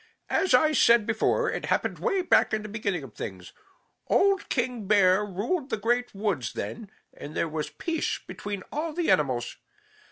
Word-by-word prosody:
As 365 -9 +3
I 310 +5 +4
said 235 -6 +5
before, 225 0 +1
it - - -4
happened - - -1
way 390 -6 0
back 345 - +3
in 215 - -4
the - - -6
beginning 200 -6 -2
of 125 -5 -11
things. 90 -1 -8 0.5
Old 395 0 +2
King 240 -6 -2
Bear 195 -1 +4
ruled 235 - -2
the 220 - -1
Great 240 +2 0
Woods 195 - -2
then, 205 - -6 0.2
and 150 - -9
there - - 0
was 155 -1 -4
peace 325 - -2
between 205 -2 -6
all 310 +2 -3
the 345 +1 +1
animals. 130 -5 0
215 Hz, 170 wpm, -27 LUFS, 180-270 Hz, 0.5 s, said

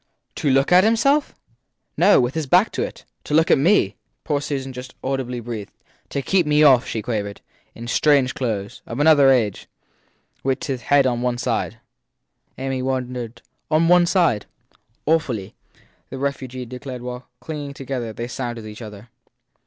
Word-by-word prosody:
To 145 - 0
look 135 +3 +3
at 180 +1 +7
himself? 275 +7 +2 0.6
No - - +5
with 125 +2 +1
his 160 -3 -3
back 180 +9 +4
to - - -3
it. - - -5 0.2
To 150 - -1
look 160 +1 +4
at - - +5
me, 185 +9 +3 0.3
poor 145 -3 -1
Susan 135 -2 -4
just 125 +1 -9
audibly 130 -2 -2
breathed. 115 -3 -6 0.4
To 140 - -3
keep 180 -1 +2
me 150 0 +4
off, 130 -5 +6
she 110 - -3
quavered. 105 -4 -3 0.4
In 115 - -8
strange 135 0 +3
clothes 105 -6 -3
of 115 - -5
another 145 -2 +6
age; 115 -7 +1 0.7
with 135 -1 -1
his 130 -4 -3
head 140 +1 +3
on 120 -2 0
one 125 -1 0
side. 120 - -2 0.8
Amy 130 0 -2
wondered. 125 -3 -4 0.3
On 160 +1 +3
one 175 0 +5
side? 170 - +2 0.6
Awfully! 130 -11 0 0.6
the 135 - -6
refugee 130 -2 -4
declared 125 +1 -7
while, 125 0 -7
clinging 145 -3 -6
together, 130 -4 -4
they 115 +2 -5
sounded 120 -3 -5
each 105 +2 -9
other. 105 0 -10
130 Hz, 160 wpm, -22 LUFS, 120-150 Hz, 0.8 s, at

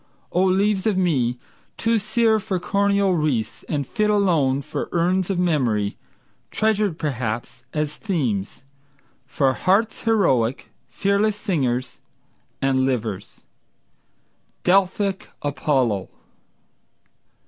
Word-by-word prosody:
O 180 - +2
leaves 195 +2 +2
of 205 -3 +1
me 130 -10 +1 0.4
Too 230 0 +2
sere 220 +1 +2
for 190 -2 -2
coronal 200 +1 +2
wreaths, 145 -10 -1
and 145 -3 -1
fit 210 +7 0
alone 165 -10 +2
For - - -4
urns 180 +2 +1
of 195 - 0
memory, 125 - +1 0.5
treasured, 215 -5 +1
perhaps, 120 -5 -3
as 150 -1 -2
themes 135 - -2 0.6
For 135 -1 +1
hearts 200 - +1
heroic, 135 - +1 0.2
fearless 200 +1 +1
singers 130 -11 -2 0.6
and 135 -1 +2
livers— 115 -7 -3 1.2
Delphic 195 +1 +1
Apollo! 130 -8 0
170 Hz, 100 wpm, -22 LUFS, 130-200 Hz, 1.2 s, O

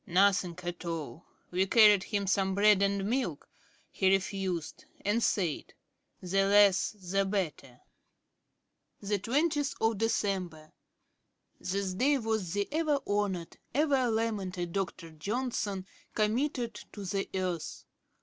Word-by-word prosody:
"Nothing 185 -1 +3
at 175 0 -5
all. 165 -1 -5 0.2
We 185 +2 +1
carried 210 -2 +7
him 200 -1 -1
some 195 0 +1
bread 205 -1 +5
and 200 0 +1
milk 230 - -2 0.4
he 190 - +2
refused 190 -4 -1
it, - - -26
and 220 +3 +2
said: 180 -9 -1 0.5
'The 195 +2 +2
less 200 -1 +5
the 195 -1 -1
better.'"' 165 -10 -3 1.2
'Dec. 200 -1 -1
20. 225 - 0 1.0
This 190 0 -1
day 275 +9 +2
was 220 -7 -2
the 205 0 0
ever 310 -3 +1
honoured, 200 -5 -2 0.2
ever 275 -4 +2
lamented 200 -6 -2
Dr. 180 -4 -3
Johnson 205 +2 -3 0.3
committed 235 +2 0 0.2
to 205 -2 -7
the 195 +1 -2
earth. 180 -4 -3
195 Hz, 115 wpm, -30 LUFS, 185-220 Hz, 1.2 s, carried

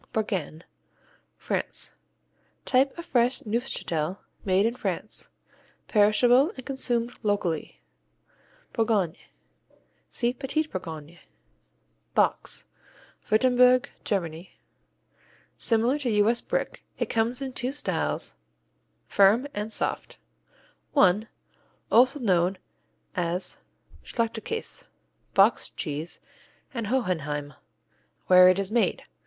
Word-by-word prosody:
Bourgain 180 -7 -2 0.7
France - - -3 0.7
Type 270 +3 +2
of 340 - -7
fresh 250 -3 +2
Neufchâtel 195 -7 -2 0.3
made 190 +1 +3
in 230 - +1
France. - - -4 0.6
Perishable 245 - +4
and 260 - -8
consumed 245 -3 +1
locally. 200 -7 -2 0.9
Bourgognes 215 -8 +1 0.9
see 240 0 0
Petits 280 +4 -1
Bourgognes. 170 - -7 1.0
Box - - +1 0.6
Württemberg, 250 +2 +4
Germany 170 -3 -3 1.0
Similar 235 +4 +1
to 265 -4 -1
U.S. 215 +2 +3
Brick. - - -3
It - - 0
comes 230 +2 0
in 270 -2 -5
two 250 +1 -2
styles; 290 - -2 0.7
firm, 205 +6 +4
and 210 +2 -4
soft: - - -2 0.8
I. 205 -1 +4 0.6
Also 255 +5 +5
known 185 -5 +2 0.6
as 180 0 -1 0.4
Schachtelkäse, 230 - -3 0.5
Boxed 200 +4 +3
Cheese; 155 0 -4 0.5
and 230 -4 -3
Hohenheim, 155 - -1 0.7
where 180 0 +8
it 185 - +3
is 195 0 -2
made. 235 +1 +1
220 Hz, 90 wpm, -26 LUFS, 185-250 Hz, 1.0 s, where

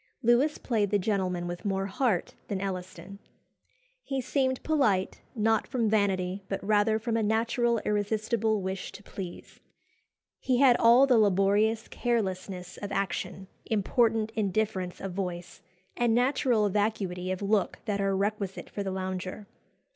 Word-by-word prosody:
Lewis 245 +6 +3
played 215 -5 0
the 205 - +3
gentleman 185 -3 -1
with 175 0 -6
more 195 -2 -1
heart 200 -1 0
than 195 - -2
Elliston. 190 +1 -6 0.8
He 270 - -3
seemed 260 0 0
polite, 220 -12 +1
not 220 0 +2
from 230 -5 0
vanity, 195 -2 +1
but 195 - -2
rather 215 +1 +3
from 225 +1 -2
a 230 - +2
natural 230 +2 +1
irresistible 215 0 0
wish 190 0 -4
to 205 - -11
please. 185 -4 -8 0.8
He 255 -2 +1
had 260 -2 +6
all 240 +4 +7
the 250 -4 +4
laborious 205 +2 +2
carelessness 190 -6 -2
of 205 -1 -6
action, 195 -1 -3 0.2
important 220 +1 +1
indifference 200 -3 -1
of 195 -2 -4
voice, 180 -2 -5 0.3
and 235 -2 +2
natural 245 -3 +2
vacuity 190 -3 -1
of 185 +2 -3
look 200 -1 +1
that 205 -2 -1
are 195 -1 +1
requisite 200 -1 -3
for 205 - -4
the 195 - -2
lounger. 185 +1 -4
205 Hz, 140 wpm, -28 LUFS, 190-225 Hz, 0.8 s, all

